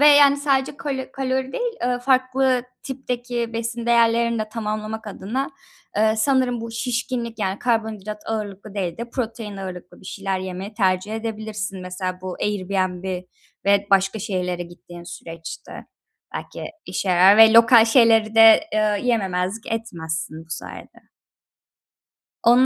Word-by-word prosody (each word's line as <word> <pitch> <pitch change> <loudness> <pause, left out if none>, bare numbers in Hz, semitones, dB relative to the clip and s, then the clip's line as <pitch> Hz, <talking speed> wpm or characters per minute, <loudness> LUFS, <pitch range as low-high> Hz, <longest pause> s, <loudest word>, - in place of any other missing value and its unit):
ve, 295 - +8
yani, 285 -1 +7
sadece 280 -1 0
kalo 270 -4 -4
kalori 265 0 -2
değil, 485 -1 -2
eee, 245 0 +1
farklı 255 0 +2 0.2
tipteki 245 -3 -4
besin 230 +1 -3
değerlerini 235 0 +3
de 215 - -3
tamamlamak 215 0 -4
adına, 230 +7 -3 0.5
eee, 220 +1 +3
sanırım, 250 0 +2
bu 230 0 -6
şişkinlik 235 -1 -3
yani, 195 -1 -1
karbonhidrat 215 -3 -2
ağırlıklı 210 -2 -5
değil 180 -4 -2
de 235 0 -6
protein 225 -5 -4
ağırlıklı 185 -2 -8
bir 185 - -13
şeyler 195 -2 -3
yemeyi 190 +3 -6
tercih 190 0 +1
edebilirsin, 215 -4 -4
mesela, 185 0 -4
bu 185 -1 -5
Airbnb 185 -2 -1 0.4
ve 200 0 +3
başka 195 +2 +3
şehirlere 180 -3 -2
gittiğin 175 0 -12
süreçte. 165 -1 -9 0.5
Belki - - -6 0.2
işe 185 +1 -3
yarar 185 +3 +6
ve 225 0 +8
lokal 230 0 +8
şeyleri 225 -2 +4
de, 225 0 +8
eee, 210 -1 +1
yememezlik 200 -1 -1
etmezsin 160 -8 -4
bu 160 - -28
sayede. - - -9 1.4
Onun 245 +2 +6
220 Hz, 135 wpm, -22 LUFS, 190-240 Hz, 1.4 s, ve